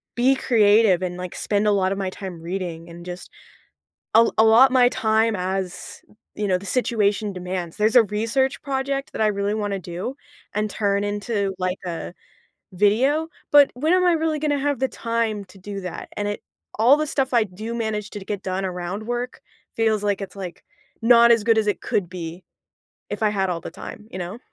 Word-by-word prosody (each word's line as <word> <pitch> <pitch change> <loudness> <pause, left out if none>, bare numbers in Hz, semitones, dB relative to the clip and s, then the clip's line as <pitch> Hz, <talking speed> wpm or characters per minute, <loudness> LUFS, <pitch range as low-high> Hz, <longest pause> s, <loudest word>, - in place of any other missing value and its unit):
be 255 +3 +4
creative 210 -6 +4
and, 180 -1 -3
like, 180 -1 -6
spend 205 0 0
a - - +5
lotta 195 -1 +1
my 195 -1 -2
time 185 -3 -8
reading 170 -1 -5
and 170 +1 -11
just 180 0 -8 0.9
al 230 +1 +6
allot 225 +4 +7
my 250 -2 +6
time 220 0 +2
as, 185 0 -4 0.3
you 210 - -1
know, 185 -1 +2
the 200 - -10
situation 210 -2 +1
demands. 180 -2 -5
There's 215 +3 +2
a 240 - +8
research 230 +6 0
project 275 0 -2
that - - -2
I 215 - +4
really 200 0 -1
wanna 205 -2 -2
do 180 +8 -5 0.4
and 210 +1 -1
turn 200 -1 0
into, 205 -1 -2
like, 185 0 -1
a 170 0 -5 0.6
video, 250 - +2 0.2
but 290 -1 +7
when 310 +7 +1
am 365 0 +4
I 355 - +5
really 320 -1 0
gonna 290 -1 0
have 285 -2 0
the 265 - +2
time 230 -3 -2
to 195 - -17
do 200 +1 -6
that? 180 - -7
And 205 - -1
it 205 - -3 0.4
all 250 +6 +6
the 305 - 0
stuff 270 -2 -1
I 235 - +5
do 215 +4 -7
manage 215 -2 -2
to 205 - -6
d 190 - -11
get 205 -1 -4
done 190 +1 -2
around 180 +3 -4
work 245 +1 -4 0.3
feels 220 -2 +1
like 205 -1 0
it's, 195 - -7
like, 185 -3 -7 0.4
not 235 0 +7
as 230 -2 +4
good 225 0 +3
as 215 - -1
it 205 -4 0
could 180 -4 -1
be 175 0 -7 0.7
if - - -4
I 215 - +4
had 195 -2 0
all 170 -1 -2
the - - -7
time, 210 +4 -10
you 185 - -7
know? 180 +5 -5
210 Hz, 200 wpm, -23 LUFS, 185-235 Hz, 0.9 s, a